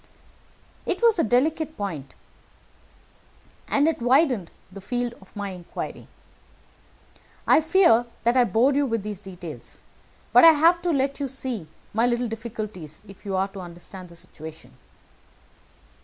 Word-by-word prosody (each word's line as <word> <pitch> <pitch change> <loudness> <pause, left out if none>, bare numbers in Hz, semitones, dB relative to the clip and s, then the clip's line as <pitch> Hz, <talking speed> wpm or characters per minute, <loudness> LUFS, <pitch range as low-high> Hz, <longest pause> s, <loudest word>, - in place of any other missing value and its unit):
It - - -1
was 455 -6 +5
a - - +4
delicate 310 +7 +1
point, 155 -10 -5 1.5
and 285 +2 +3
it 325 -6 0
widened 250 - +3 0.2
the 195 +1 -10
field 245 +3 -2
of 190 - -19
my 200 -1 -4
inquiry. 180 -2 -7 1.4
I - - +5
fear 320 -8 +4 0.2
that 235 +2 +3
I 250 -1 +5
bore 240 +5 +3
you 285 0 +2
with 230 -4 -1
these 210 -2 -6
details, 180 -5 -9 0.5
but - - +8
I 330 -1 +10
have 335 +3 +4
to 355 - -1
let 275 -1 0
you 280 - -1
see 255 -9 -4 0.3
my 225 +3 +3
little 240 0 0
difficulties, 215 -8 -7
if 195 +2 -15
you 195 - -1
are 190 +1 0
to 195 - -10
understand 180 +1 -10
the 170 - -14
situation." 160 -1 -11
230 Hz, 145 wpm, -25 LUFS, 190-275 Hz, 1.5 s, I